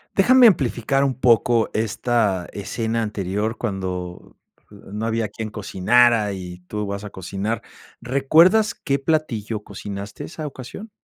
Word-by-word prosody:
Déjame 250 +6 +6
amplificar 135 - +3
un 130 -2 -1
poco 120 -2 +3
esta 110 -3 0
escena 115 +3 -2
anterior, 105 +1 -2
cuando 90 -5 -5 0.3
no 105 +3 -6
había 115 -1 0
quien 110 +2 -6
cocinara 110 +1 +2
y 90 -2 -8
tú 105 0 -3
vas 100 +1 -5
a 105 - -6
cocinar, 100 +5 -4 0.4
¿recuerdas 160 - +4
qué 140 -2 -1
platillo 120 -8 -1
cocinaste 100 0 -7
esa 155 -1 -7
ocasión? 140 - -8
110 Hz, 125 wpm, -22 LUFS, 100-130 Hz, 0.4 s, Déjame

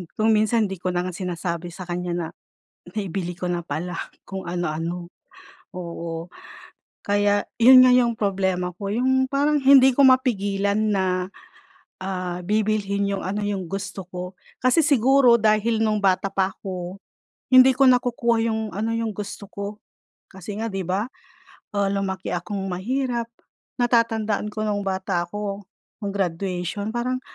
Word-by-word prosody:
kung 220 +1 +2
minsan 220 +1 +3
hindi 190 -2 -6
ko 180 +1 -2
na 175 0 0
nga 185 - -3
sinasabi 175 -1 -4
sa 185 - -7
kanya 175 0 -3
na 170 -2 -2 0.7
naibili 190 -3 -3
ko 180 +1 -4
na 175 - -1
pala, 170 +3 -4 0.3
kung 190 -2 -7
ano-ano, 175 0 -3 0.7
oo. 170 -1 -5 0.8
Kaya 205 0 +1
yun 255 +2 +9
nga - - +6
yung 240 -2 +3
problema 190 -4 -1
ko, 200 0 -3
yung 260 +3 +2
parang 290 +2 +2
hindi 265 -1 +8
ko 280 - +6
mapigilan 205 -6 +2 0.2
na, 190 -1 +1 0.9
ah, 185 -2 -4
bibilhin 205 -1 0
yung 200 -2 -3
ano 205 +2 -2
yung 200 -3 -2
gusto 195 +1 -5
ko. 180 0 -7 0.2
Kasi 255 +5 +4
siguro, 265 -2 +5
dahil 220 +1 +2
nung 215 -1 +2
bata 195 -1 +1
pa 190 0 0
ako, 180 -2 -6 0.6
hindi 255 +1 +9
ko 270 +1 +5
nakukuha 240 -2 +3
yung 220 0 -1
ano, 215 +3 -1
yung 230 -2 -2
gusto 200 0 -7
ko. 200 +1 -7 0.5
Kasi 190 +2 -8
nga 225 0 -2
di 195 -3 -4
ba, 185 +3 0 0.8
ah, 200 -1 +2
lumaki 190 -1 -3
akong 190 +3 -3
mahirap. 235 +5 -2 0.5
Natatandaan 225 -3 +1
ko 215 +1 -4
nung 205 -1 -1
bata 190 -2 -1
ako, 205 0 -4 0.4
nung 200 -1 -3
graduation. 185 +2 -2
Parang 250 +2 -1
200 Hz, 145 wpm, -23 LUFS, 185-225 Hz, 0.9 s, yun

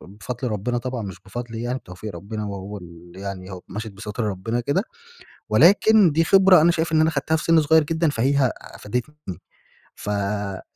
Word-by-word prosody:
ب - - -14
بفضل 120 +4 -4
ربنا 115 +3 -2
طبعًا 125 -1 -4
مش 95 -3 -8
بفضلي 115 +2 -6
يعني 125 +2 -2
بتوفيق 95 +1 -9
ربنا 105 +5 -6
وهو 100 0 -6
ال 85 0 -14
يعني 95 -1 -7
هو 90 - -7
مشيت 105 +2 -6
بستر 105 +2 -5
ربنا 105 +4 -2
كده. 140 +10 0 0.7
ولكن 205 0 +5
دي 165 +3 +2
خبرة 190 -1 +6
أنا 170 - +5
شايف 165 -1 -1
إن 155 - +4
أنا 160 - +4
خدتها 155 +1 0
في 160 - -2
سن 165 -1 +4
صغير 160 +1 +4
جدًا 160 +1 0
فهي 135 0 +2
أفادتني. 125 +8 -5 0.8
ف - - -7
آآ 100 -1 -2
120 Hz, 185 wpm, -23 LUFS, 100-155 Hz, 0.8 s, خبرة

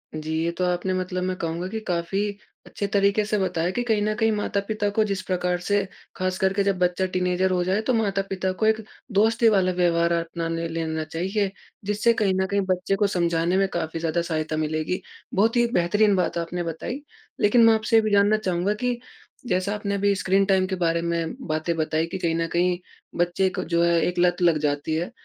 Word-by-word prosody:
जी, 155 0 -5
ये 170 - 0
तो 180 +2 -2
आपने 180 +1 0
मतलब 185 0 -2
मैं 185 0 -1
कहूँगा 170 +2 -3
कि 220 +2 -3
काफ़ी 175 +3 -1 0.4
अच्छे 200 - -4
तरीके 200 +1 +3
से 210 0 0
बताया 180 -2 0
कि 245 +5 -2
कहीं 220 -3 +1
न 215 +1 +1
कहीं 220 +1 +2
माता-पिता 205 0 -1
को 215 +2 +2
जिस 200 -3 -2
प्रकार 180 -1 0
से, 200 +3 +1 0.3
ख़ास 185 0 -1
करके 195 +1 +2
जब 195 -1 +1
बच्चा 180 +1 +1
टीनेजर 180 0 0
हो 180 -1 +1
जाए, 190 +4 +1
तो 250 +3 0
माता-पिता 195 -3 -1
को 215 - -1
एक 220 0 +2 0.3
दोस्ती 225 +3 +4
वाला 190 -3 +3
व्यवहार 170 -1 +2
अपना 165 0 -2
ने 165 0 -2
लेना 160 -1 -3
चाहिए। 190 +6 -2 0.3
जिससे 210 +3 +2
कहीं 205 -4 +1
न - - +1
कहीं 200 +1 +1
बच्चे 185 +2 0
को 205 +1 +2
समझाने 170 -1 +1
में 195 0 +3
काफ़ी 165 -1 -3
ज़्यादा 165 +1 0
सहायता 155 -2 -2
मिलेगी। 155 +3 -1 0.3
बहुत 220 +5 +2
ही 240 - +4
एक 235 0 -2
बेहतरीन 205 +4 +3
बात 180 -2 0
आपने 175 +1 -3
बताई। 170 - -5 0.4
लेकिन 230 +3 +5
मैं 225 - +7
आपसे 220 +1 +1
ये 225 - +7
भी 215 -1 -1
जानना 205 +1 +4
चाहूँगा 185 -1 0
कि 245 +2 -2 0.5
जैसा 185 0 0
आपने 200 -1 -2
अभी 200 0 +2
स्क्रीन 195 0 +2
टाइम 190 -1 +3
के 190 - -2
बारे 170 -2 0
में 170 +2 -2
बातें 155 +2 -1
बताई 160 0 0
कि 190 - -5
कहीं 165 -2 0
न 165 0 0
कहीं 175 +1 +2 0.4
बच्चे 175 +2 +1
को 180 - -4
जो 170 0 +1
है 170 -1 +3
एक 180 0 -2
लत 175 0 +2
लग 170 -3 +4
जाती 145 +1 -1
है। 170 +2 -2
185 Hz, 215 wpm, -24 LUFS, 170-205 Hz, 0.5 s, मैं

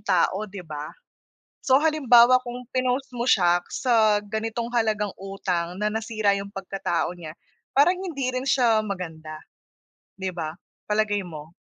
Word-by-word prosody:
tao 195 +2 +1
'di 190 -2 -8
ba? 150 -1 -6 0.8
So 265 +2 +5
halimbawa 255 -6 +6
kung 245 +1 -6
pinost 255 +1 -1
mo 235 - -1
siya 175 -7 +4
sa 220 -4 +3
ganitong 225 +3 -3
halagang 215 -4 0
utang 185 -1 -3
na 210 - +2
nasira 215 -2 0
'yong 200 0 -7
pagkatao 195 -3 -2
niya 155 -2 -8 0.4
parang 290 +7 +5
hindi 325 -9 -3
rin 255 0 -3
siya 235 -5 +3
maganda, 160 -5 -6 0.8
'di 190 -1 -3
ba? 160 -1 -4 0.3
Palagay 210 -1 +1
mo? 160 -3 -10
210 Hz, 140 wpm, -25 LUFS, 180-245 Hz, 0.8 s, halimbawa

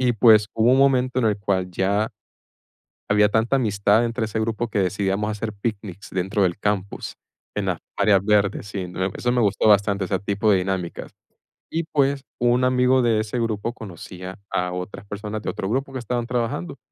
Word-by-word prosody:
y 125 -1 +3
pues, 110 -2 +6
hubo 115 +2 +4
un 135 - +4
momento 130 -2 +3
en 125 - +1
el 105 - +2
cual 95 -2 -1
ya 100 +4 0 1.0
había 105 0 +4
tanta 110 +5 +2
amistad 105 -1 +2
entre 115 -1 -1
ese 110 +1 -3
grupo 115 +1 -1
que 105 - -2
decidíamos 100 +2 0
hacer 105 +1 -4
picnics 100 -2 -5
dentro 95 +2 0
del 90 -1 0
campus, 100 -1 -2 0.4
en - - -1
las - - -1 0.2
áreas 100 -1 +4
verdes, 105 -1 +2
sí, 100 -3 -4 0.3
eso 125 - 0
me 125 - +2
gustó 105 -1 +2
bastante, 100 -1 +3
ese 95 +1 -1
tipo 100 +2 -1
de 95 - +4
dinámicas, 90 -2 -3 0.6
y 165 +1 -1
pues, 140 -1 +2 0.2
un 120 +1 +3
amigo 125 0 +3
de 115 -3 +2
ese 110 +3 -3
grupo 115 0 -2
conocía 95 -2 -9
a 90 0 -1
otras 90 +2 -6
personas 105 +1 -5
de - - -3
otro 95 - -3
grupo 135 +4 -1
que 130 - -3
estaban 120 +1 -2
trabajando, 115 -8 -2
105 Hz, 185 wpm, -23 LUFS, 100-120 Hz, 1.0 s, pues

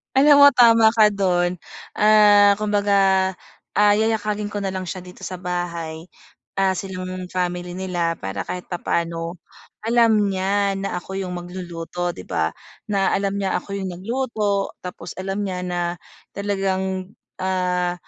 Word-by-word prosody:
Alam 285 +1 +7
mo 285 - +10
tama 230 -2 +7
ka 215 -2 +6
dun, 180 -3 0 0.4
ah, 205 -1 +6
kumbaga, 200 -2 +2 0.4
ah, 205 0 +5
yayakagin 215 -1 0
ko 205 0 -4
na 195 - -1
lang 185 -1 -5
siya 185 0 -5
dito 180 0 -11
sa 185 - -5
bahay. 170 -2 -4 0.5
Ah, 195 -1 +3
silang 185 -1 -6
family 180 -1 -3
nila 175 -3 -1
para 95 0 -4
kahit 180 0 -6
papaano 170 -1 -3 0.5
alam 225 -3 +4
niya 195 +1 +1
na 195 -2 -3
ako 190 - -10
yung 180 -1 -4
magluluto, 175 -1 -5
'di 90 - -11
ba? 80 0 0 0.4
Na 195 -2 +1
alam 200 0 0
niya 195 -1 -1
ako 200 0 -6
yung 190 -2 -4
nagluto 210 0 -2
tapos 180 -1 -8
alam 195 +2 -2
niya 185 -2 -3
na 180 -1 -3 0.5
talagang, 190 -1 -2 0.2
ah, 180 -1 0
190 Hz, 145 wpm, -22 LUFS, 180-205 Hz, 0.5 s, mo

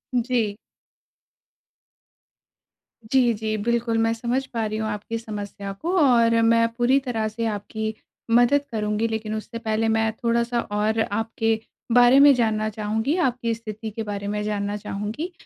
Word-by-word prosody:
जी। 235 -4 0 2.5
जी, 250 -3 +4
जी 215 0 -3
बिल्कुल। 235 +1 0
मैं 225 0 +2
समझ 245 +3 -2
पा 225 -1 -1
रही 215 0 -3
हूँ 220 0 -2
आपकी 210 +2 -4
समस्या 205 -2 -6
को 345 - -1
और 230 -5 +4
मैं 230 0 +4
पूरी 255 +3 +3
तरह 230 -5 -2
से 230 +2 -4
आपकी 220 +1 -3 0.4
मदद 245 +4 +5
करुँगी। 210 +1 -1
लेकिन 220 -1 -3
उससे 230 +2 -6
पहले 225 -1 -1
मैं 220 0 +2
थोड़ा-सा 235 +1 +1
और 210 +1 -1
आपके 225 +1 -1 0.3
बारे 245 +2 +7
में 285 0 +8
जानना 215 -2 +1
चाहूँगी, 220 - -1
आपकी 245 -7 0
स्थिति 220 0 -6
के 225 +2 -4
बारे 200 -1 -5
में 210 0 -2
जानना 205 -1 -2
चाहूँगी। 210 - -5
225 Hz, 150 wpm, -24 LUFS, 215-235 Hz, 2.5 s, में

